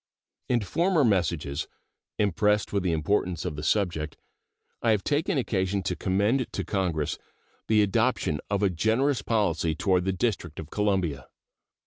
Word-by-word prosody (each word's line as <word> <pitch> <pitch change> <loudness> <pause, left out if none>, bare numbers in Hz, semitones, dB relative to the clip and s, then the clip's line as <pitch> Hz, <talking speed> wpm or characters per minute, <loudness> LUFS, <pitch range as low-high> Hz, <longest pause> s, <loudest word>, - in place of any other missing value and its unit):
In 120 -2 +2
former 165 - +2
messages, 85 - 0 0.5
impressed 105 +1 +1
with 100 - +2
the 90 -1 0
importance 85 +2 0
of 75 - -3
the 75 - -5
subject, 80 -3 0 0.6
I 115 - +1
have 105 -3 +2
taken 155 +4 0
occasion 100 -5 0
to 90 - -1
commend 100 - +1
to - - -2
Congress 85 -7 -1 0.5
the 105 -1 +4
adoption 110 - +1
of 100 0 0
a 100 - +3
generous 110 - +1
policy 85 -8 0
toward 90 0 +1
the 95 - +1
District 90 -6 -2
of 80 - -8
Columbia. 95 - 0
100 Hz, 145 wpm, -27 LUFS, 85-110 Hz, 0.6 s, the